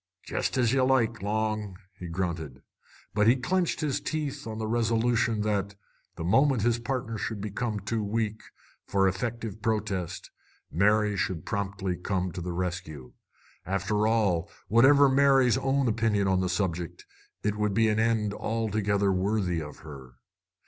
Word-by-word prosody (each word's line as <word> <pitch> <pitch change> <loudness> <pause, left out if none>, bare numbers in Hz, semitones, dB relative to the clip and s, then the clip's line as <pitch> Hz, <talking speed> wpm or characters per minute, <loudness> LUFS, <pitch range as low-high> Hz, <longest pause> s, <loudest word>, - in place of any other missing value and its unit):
"Jest - - -2
as 120 -1 +3
ye 135 - +3
like, 125 -4 +2
Long!" 105 -1 -2 0.2
he 90 -1 -8
grunted. 85 -6 -4 0.5
But 105 +1 +3
he 120 - +6
clenched 175 +7 0
his 150 -3 -1
teeth 150 -6 -3
on 110 -1 -5
the 110 - -3
resolution 115 0 +1
that, 100 -1 -1 0.4
the - - -5
moment 130 - +3
his 120 0 +2
partner 120 -2 -3
should 110 -1 -3
become 105 +2 -3
too 110 +2 -2
weak 110 +1 -2 0.5
for 95 -1 +2
effective 110 +2 -3
protest, 100 -6 -2 0.4
Mary 105 +3 +3
should 90 -4 -2
come 100 -2 -2
promptly 95 -2 -2
to 90 -1 -2
the 90 +1 -4
rescue. 85 -7 -5 0.5
After 100 +3 0
all, 100 -7 +1 0.2
whatever 135 +6 +6
Mary's 135 -2 +4
own 135 0 +1
opinion 105 -3 +1
on 95 -1 +2
the 90 -1 0
subject, 90 -3 -2 0.4
it 105 0 0
would 105 -2 0
be 110 0 +4
an 110 0 +1
end 110 -2 +1
altogether 105 -3 0
worthy 95 -2 0
of 75 -1 -9
her. 65 -5 -10
105 Hz, 150 wpm, -28 LUFS, 95-115 Hz, 0.5 s, he